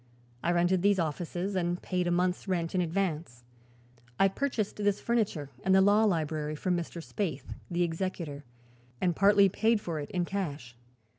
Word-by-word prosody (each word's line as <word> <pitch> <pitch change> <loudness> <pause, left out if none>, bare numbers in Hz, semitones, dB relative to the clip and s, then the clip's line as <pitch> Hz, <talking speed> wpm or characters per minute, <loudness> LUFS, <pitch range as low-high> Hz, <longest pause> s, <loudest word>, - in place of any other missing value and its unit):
I 175 - +1
rented 175 +1 +2
these 200 +1 +4
offices 175 +4 -2
and 175 -1 0
paid 180 -1 -1
a - - +1
month's 180 +2 0
rent 170 -3 -1
in 185 - +2
advance. 165 -8 -2 0.8
I 195 - +5
purchased 225 -1 -2
this 205 -1 +1
furniture 200 - -1
and 190 0 +4
the - - +7
law 205 +3 +5
library 155 -5 -1
from 180 +4 0
Mr. 170 -1 -4
Spaythe, 155 -11 -4 0.2
the 175 0 +1
executor, 165 -4 -3 0.6
and 175 -2 +1
partly 200 0 +6
paid 220 +4 +2
for 170 -6 -4
it 145 - -6
in 180 -2 -1
cash. 145 -11 -4
180 Hz, 165 wpm, -30 LUFS, 165-195 Hz, 0.8 s, the